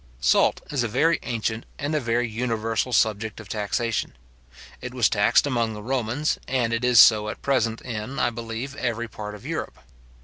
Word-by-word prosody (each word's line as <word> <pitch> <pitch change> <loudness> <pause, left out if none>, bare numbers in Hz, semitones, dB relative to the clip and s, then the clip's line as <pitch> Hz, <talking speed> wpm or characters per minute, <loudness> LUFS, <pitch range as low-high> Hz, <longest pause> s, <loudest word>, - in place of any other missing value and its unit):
Salt - - +3
is 140 -4 0
a 120 - 0
very 160 +9 +2
ancient 115 -1 -2
and 145 +2 -3
a 155 - +2
very 120 -1 0
universal 115 +1 -1
subject 110 -2 +1
of 110 - -10
taxation. 110 +3 -2 0.7
It 125 0 -7
was 120 -3 +4
taxed 105 +6 +3
among 115 -5 0
the 105 - -8
Romans, 130 +4 -1
and 120 -3 0
it 115 +2 -1
is 125 -2 +5
so 105 -1 +7
at - - -8
present 115 -5 +1
in, 115 +2 -5
I 120 - +1
believe, 115 +4 -6
every 120 -1 -2
part 105 -2 -7
of 105 - -13
Europe. - - -4
115 Hz, 180 wpm, -24 LUFS, 110-125 Hz, 0.7 s, so